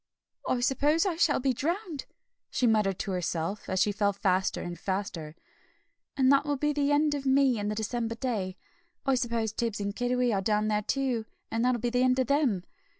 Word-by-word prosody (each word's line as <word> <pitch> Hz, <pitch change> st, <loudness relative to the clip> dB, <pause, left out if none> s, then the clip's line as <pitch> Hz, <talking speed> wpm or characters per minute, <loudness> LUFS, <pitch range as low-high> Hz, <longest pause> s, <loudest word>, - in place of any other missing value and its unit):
"I 245 Hz, -, +1 dB
suppose 290 Hz, +6 st, +2 dB
I 370 Hz, -4 st, 0 dB
shall 325 Hz, -3 st, +3 dB
be 265 Hz, 0 st, +1 dB
drowned," 335 Hz, -, -3 dB, 0.4 s
she 250 Hz, -, 0 dB
muttered 210 Hz, -5 st, +2 dB
to 195 Hz, -, -3 dB
herself, 180 Hz, +2 st, -2 dB
as 185 Hz, -, 0 dB
she 205 Hz, -, +3 dB
fell 205 Hz, 0 st, +1 dB
faster 190 Hz, -1 st, 0 dB
and 175 Hz, -1 st, -6 dB
faster, 185 Hz, -6 st, -3 dB, 0.8 s
"and 265 Hz, -1 st, +5 dB
that 275 Hz, 0 st, +5 dB
will 290 Hz, -1 st, -1 dB
be 295 Hz, +2 st, 0 dB
the 290 Hz, 0 st, +1 dB
end 295 Hz, +1 st, +3 dB
of 280 Hz, -1 st, -3 dB
me 265 Hz, -3 st, +4 dB
and 205 Hz, 0 st, -2 dB
the 210 Hz, -, -2 dB
December 230 Hz, +1 st, -2 dB
day. 210 Hz, -7 st, -3 dB, 0.5 s
I 270 Hz, -, +3 dB
suppose 230 Hz, -3 st, -1 dB
Tibbs 225 Hz, -2 st, -2 dB
and 200 Hz, 0 st, -3 dB
Kiddiwee 245 Hz, 0 st, +1 dB
are 195 Hz, -, +1 dB
down 210 Hz, +1 st, +1 dB
there 210 Hz, 0 st, +1 dB
too, 245 Hz, -1 st, -1 dB, 0.2 s
and 230 Hz, +1 st, 0 dB
that'll 250 Hz, -2 st, +2 dB
be 240 Hz, -, 0 dB
the 250 Hz, +1 st, +2 dB
end 255 Hz, 0 st, +3 dB
of 260 Hz, -, +2 dB
them. 260 Hz, -, +1 dB
235 Hz, 205 wpm, -28 LUFS, 205-270 Hz, 0.8 s, and